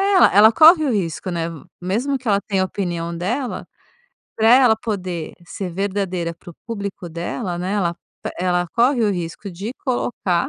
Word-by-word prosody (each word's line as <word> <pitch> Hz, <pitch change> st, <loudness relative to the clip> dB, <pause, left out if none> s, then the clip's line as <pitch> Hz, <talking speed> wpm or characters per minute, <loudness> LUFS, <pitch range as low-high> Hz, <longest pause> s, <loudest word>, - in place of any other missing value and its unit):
ela 370 Hz, -, +7 dB
ela 215 Hz, +2 st, +8 dB
corre 315 Hz, +4 st, +7 dB
o 270 Hz, -, +1 dB
risco, 185 Hz, -3 st, -2 dB
né? 170 Hz, -2 st, -2 dB, 0.4 s
Mesmo 230 Hz, +10 st, -1 dB
que 255 Hz, -1 st, -10 dB
ela 200 Hz, -1 st, +3 dB
tenha 195 Hz, -2 st, 0 dB
a -, -, +1 dB
opinião 170 Hz, -3 st, -3 dB
dela, 235 Hz, +10 st, -3 dB, 0.7 s
pra 220 Hz, 0 st, +3 dB
ela 250 Hz, -2 st, +7 dB
poder 185 Hz, -7 st, -4 dB
ser 185 Hz, -1 st, -5 dB
verdadeira 185 Hz, -2 st, -2 dB
pro 170 Hz, +1 st, -13 dB
público 200 Hz, -6 st, -5 dB
dela, 175 Hz, +2 st, -4 dB
né, 185 Hz, +3 st, -2 dB
ela 175 Hz, -4 st, 0 dB, 0.5 s
ela 180 Hz, -1 st, +1 dB
corre 240 Hz, -, +2 dB
o 210 Hz, -, +2 dB
risco 175 Hz, +2 st, -5 dB
de 195 Hz, +7 st, -6 dB
colocar 205 Hz, -8 st, 0 dB
195 Hz, 165 wpm, -21 LUFS, 175-230 Hz, 0.7 s, ela